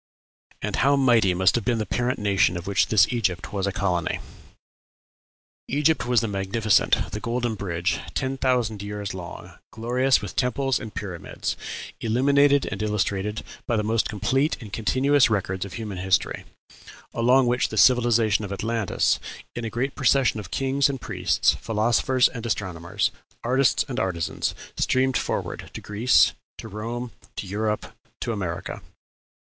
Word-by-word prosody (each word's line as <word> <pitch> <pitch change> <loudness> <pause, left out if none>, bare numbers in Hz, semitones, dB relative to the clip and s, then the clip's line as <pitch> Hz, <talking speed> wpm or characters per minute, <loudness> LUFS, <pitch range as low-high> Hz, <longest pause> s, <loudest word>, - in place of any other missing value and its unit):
And - - -2
how 140 +2 +4
mighty 120 -9 +4
must 95 +1 +4
have 120 - 0
been 120 0 +1
the 110 - -1
parent 125 +3 -1
nation 100 -3 +2
of 90 - -7
which 100 0 +2
this 110 - +5
Egypt 95 -7 -1
was 100 -1 -1
a - - 0
colony! 90 -2 -1 1.5
Egypt 150 -1 +1
was 125 -2 +3
the 115 - -1
magnificent, 100 +1 +1
the 105 - -4
golden 120 +1 -1
bridge, 90 -2 -2 0.2
ten 135 0 -1
thousand 120 -6 0
years 100 0 -5
long, 90 -3 -9
glorious 125 +4 +2
with - - -7
temples 135 0 +1
and 110 - -9
pyramids, 90 -6 -4 0.4
illuminated 140 +4 +3
and 100 0 -4
illustrated 105 0 -1 0.2
by 120 - +1
the 105 - 0
most 110 +1 +1
complete 135 +8 0
and 105 -5 -11
continuous 130 +4 +3
records 95 -3 -1
of 100 - -9
human 105 -5 -5
history, 95 0 0 0.7
along 125 +3 +4
which 120 +1 +1
the 110 - -5
civilization 115 -1 +4
of 100 - -5
Atlantis, 110 0 0 0.4
in 120 - -4
a - - -2
great 130 +5 -2
procession 130 -3 +2
of 100 -6 -8
kings 135 +4 +1
and 135 -1 -3
priests, - - +1
philosophers 120 +3 +2
and 115 -3 -7
astronomers, 90 -5 -1 0.3
artists 130 +2 +2
and 130 -2 -3
artisans, 85 -5 -2 0.2
streamed 130 0 +2
forward - - -3
to - - -4
Greece, 110 +5 +3 0.2
to - - -8
Rome, 115 +3 -5 0.2
to - - -5
Europe, 105 +2 -2 0.3
to - - -1
America. 95 -3 -4
110 Hz, 155 wpm, -24 LUFS, 100-125 Hz, 1.5 s, this